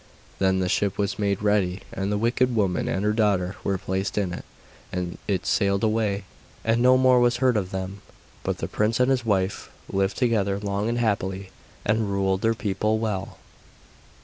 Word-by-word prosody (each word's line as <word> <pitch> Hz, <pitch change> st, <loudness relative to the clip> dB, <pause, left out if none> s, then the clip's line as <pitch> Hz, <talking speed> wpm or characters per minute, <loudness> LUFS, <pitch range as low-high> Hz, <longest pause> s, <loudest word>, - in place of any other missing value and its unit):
Then 95 Hz, -1 st, +2 dB
the 90 Hz, -, 0 dB
ship 100 Hz, +2 st, 0 dB
was 100 Hz, 0 st, -1 dB
made 100 Hz, -1 st, 0 dB
ready 100 Hz, -3 st, +1 dB
and 95 Hz, +1 st, -2 dB
the 105 Hz, -, +1 dB
wicked 120 Hz, +3 st, +1 dB
woman 95 Hz, -5 st, +1 dB
and 95 Hz, +2 st, -1 dB
her 105 Hz, -, +2 dB
daughter 100 Hz, -4 st, +1 dB
were 100 Hz, -1 st, 0 dB
placed 95 Hz, +3 st, -3 dB
in 95 Hz, -4 st, 0 dB
it, -, -, -7 dB, 0.5 s
and 90 Hz, -1 st, -4 dB
it 95 Hz, -3 st, -1 dB
sailed 100 Hz, +1 st, +1 dB
away, 110 Hz, -3 st, +1 dB, 0.4 s
and 115 Hz, +1 st, +2 dB
no 130 Hz, +1 st, +6 dB
more 130 Hz, -1 st, +5 dB
was 120 Hz, 0 st, +3 dB
heard 130 Hz, -1 st, +3 dB
of 95 Hz, -4 st, 0 dB
them. 95 Hz, +1 st, -5 dB, 0.4 s
But -, -, -2 dB
the -, -, -3 dB
prince 110 Hz, +3 st, 0 dB
and 125 Hz, +1 st, +4 dB
his 125 Hz, -3 st, +1 dB
wife 95 Hz, -2 st, 0 dB, 0.2 s
lived 95 Hz, 0 st, 0 dB
together 105 Hz, -6 st, +1 dB
long 100 Hz, +1 st, -1 dB
and 120 Hz, -, -1 dB
happily, 95 Hz, -4 st, -1 dB, 0.3 s
and 110 Hz, 0 st, +1 dB
ruled 95 Hz, -1 st, 0 dB
their 115 Hz, 0 st, +2 dB
people 110 Hz, 0 st, 0 dB
well. 105 Hz, -4 st, -3 dB
100 Hz, 185 wpm, -25 LUFS, 95-110 Hz, 0.5 s, no